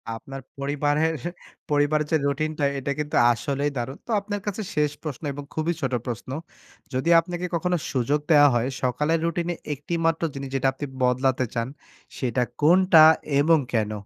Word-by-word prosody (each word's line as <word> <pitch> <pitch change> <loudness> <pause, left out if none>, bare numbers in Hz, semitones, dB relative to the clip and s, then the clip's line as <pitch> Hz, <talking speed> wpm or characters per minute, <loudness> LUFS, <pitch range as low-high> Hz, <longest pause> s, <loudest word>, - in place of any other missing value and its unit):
আপনার 135 +4 -9 0.2
পরিবারের, 145 +3 0 0.6
পরিবারের 145 +1 +2
যে 160 - +4
রুটিনটা, 150 +1 -1
এটা 140 +1 -3
কিন্তু 150 0 -3 0.2
আসলেই 140 +4 -1
দারুণ। 130 +4 -4
তো - - -4
আপনার 205 0 -5
কাছে 205 +2 -2
শেষ 150 -1 +2
প্রশ্ন 150 -1 -6
এবং 145 +1 -7
খুবই 160 +2 0
ছোট - - -1
প্রশ্ন। 120 +1 -5 0.6
যদি 130 +6 0
আপনাকে 175 +1 -4
কখনো 180 +1 0
সুযোগ 135 +3 +1
দেওয়া 145 -1 +7
হয়, 120 +3 +1
সকালের 150 +6 +1
রুটিনে 170 +1 -1 0.2
একটি 145 +5 -7
মাত্র 165 0 +1
জিনিস, 135 -1 -6
যেটা 135 0 +1
আপনি 145 +2 -5 0.2
বদলাতে 130 0 +2
চান। 115 0 -1 0.5
সেটা 125 -1 0 0.2
কোনটা 175 0 +6 0.4
এবং 160 +1 +4
কেন? 110 -2 +1
145 Hz, 160 wpm, -24 LUFS, 135-160 Hz, 0.6 s, দেওয়া